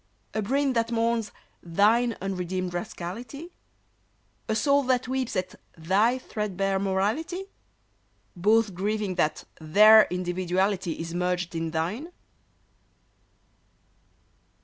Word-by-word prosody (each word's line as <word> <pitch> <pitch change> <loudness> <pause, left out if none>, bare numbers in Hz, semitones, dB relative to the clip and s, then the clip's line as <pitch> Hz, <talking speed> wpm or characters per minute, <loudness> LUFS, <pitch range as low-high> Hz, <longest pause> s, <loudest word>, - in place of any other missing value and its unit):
A 220 - -1
brain 270 +5 +1
that 230 -1 0
mourns 230 -2 0 0.3
thine 215 +7 +2
unredeemed 185 -1 -3
rascality? 225 - -6 1.0
A 220 - +1
soul 280 +5 +3
that 255 -1 +1
weeps 260 -3 -2
at 185 -1 -2 0.2
thy 200 +10 +2
threadbare 195 -5 -2
morality? 210 - -1 0.9
Both 210 +3 +2
grieving 205 +1 -2
that 155 -3 0 0.2
their 215 +7 +7
individuality 180 +1 -1
Is 165 +1 -6
merged 180 0 -1
in 165 0 -2
thine? 180 - -3
200 Hz, 100 wpm, -26 LUFS, 180-230 Hz, 1.0 s, their